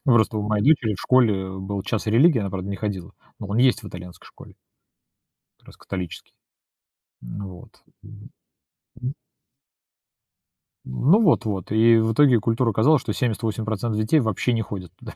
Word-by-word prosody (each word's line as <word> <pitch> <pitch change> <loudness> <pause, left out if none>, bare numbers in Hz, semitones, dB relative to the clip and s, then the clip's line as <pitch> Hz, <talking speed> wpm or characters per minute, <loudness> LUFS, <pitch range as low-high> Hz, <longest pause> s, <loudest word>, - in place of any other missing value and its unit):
Просто 115 -5 +3
у - - -2
моей 105 0 -1
дочери 130 -7 +3
в - - -9
школе 105 -7 +2
был 95 +1 -5
час 110 +2 -3
религии, 125 +7 +4
она, 100 -3 -3
правда, 95 0 -5
не 100 - -4
ходила. 100 -5 -5 0.3
Но 100 - -7
он 105 - -1
есть 125 -1 +3
в 105 - -8
итальянской 90 -1 -11
школе. - - -15 1.1
Как - - -29
раз - - -15
католический. 90 -4 -7 0.9
Ну 95 +12 -7
вот, - - -21 0.2
м, 105 0 -13 0.7
мгм. 125 +4 -5 1.7
М, 65 - -2
ну 215 - +6
вот, 170 - +3
вот, 100 -5 -4
и 115 +1 +5
в 110 0 +1
итоге 130 -2 +5
культура 115 +2 0
оказалась, 130 +8 +3
что - - -4
78% 115 -2 -2 0.3
детей 110 +9 +2
вообще 110 0 -1
не 115 -2 0
ходят 95 -5 -7
туда. - - -10
110 Hz, 165 wpm, -23 LUFS, 100-120 Hz, 1.7 s, ну